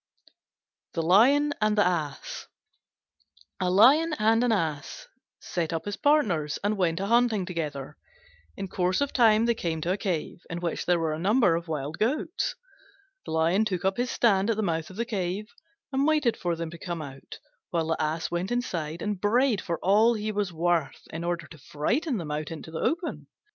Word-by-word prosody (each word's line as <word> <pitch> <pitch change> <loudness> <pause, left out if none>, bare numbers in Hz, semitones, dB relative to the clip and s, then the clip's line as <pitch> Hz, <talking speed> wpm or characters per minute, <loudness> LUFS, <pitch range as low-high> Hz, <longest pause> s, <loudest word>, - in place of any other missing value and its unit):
THE 165 - 0
LION 270 - +5
AND 215 0 +2
THE 205 - +5
ASS 155 -6 -3 1.1
A 180 - +1
Lion 280 - +5
and 225 +2 +3
an 245 - +2
Ass 160 -9 -2 0.3
set 165 -3 -3
up 165 -1 -3
as 205 -1 -3
partners 210 - +2
and 205 +1 +1
went 175 -4 0
a 195 - -1
hunting 230 -3 +2
together. 150 -6 -5 0.6
In 195 - -4
course 180 0 0
of 285 -1 -1
time 225 -2 +5
they 235 - +3
came 165 -7 -3
to 170 - -1
a 190 - 0
cave 180 -5 -3
in 170 - -4
which 170 -2 -3
there 175 -1 +4
were 165 -2 -1
a 155 - -4
number 200 -1 +3
of 170 +1 -4
wild 150 0 -4
goats. 295 +9 -1 0.7
The - - -6
Lion 165 +6 +2
took 190 -4 -2
up 190 0 +1
his 245 0 0
stand 205 -3 +2
at 225 - +1
the 220 - 0
mouth 165 -3 -1
of 190 - -11
the 235 +3 -2
cave, 205 0 -3 0.4
and 275 +2 +1
waited 300 -7 +2
for 175 -2 -2
them 165 -1 -5
to 170 - -10
come 170 -2 -4
out; 135 -2 -10 0.3
while 165 -2 0
the 160 0 -1
Ass 155 +1 -2
went 175 +4 -2
inside 170 -10 -2
and 205 -3 -3
brayed 235 +1 +2
for 170 -2 -3
all 215 +5 +4
he 215 0 -2
was 205 -3 -1
worth 170 -2 0
in 165 +1 -4
order 175 -1 -2
to 155 - -14
frighten 240 - -1
them 160 -5 -5
out 150 0 -3
into 160 0 -8
the 160 - -4
open. 330 +1 -2
185 Hz, 195 wpm, -27 LUFS, 165-225 Hz, 1.1 s, LION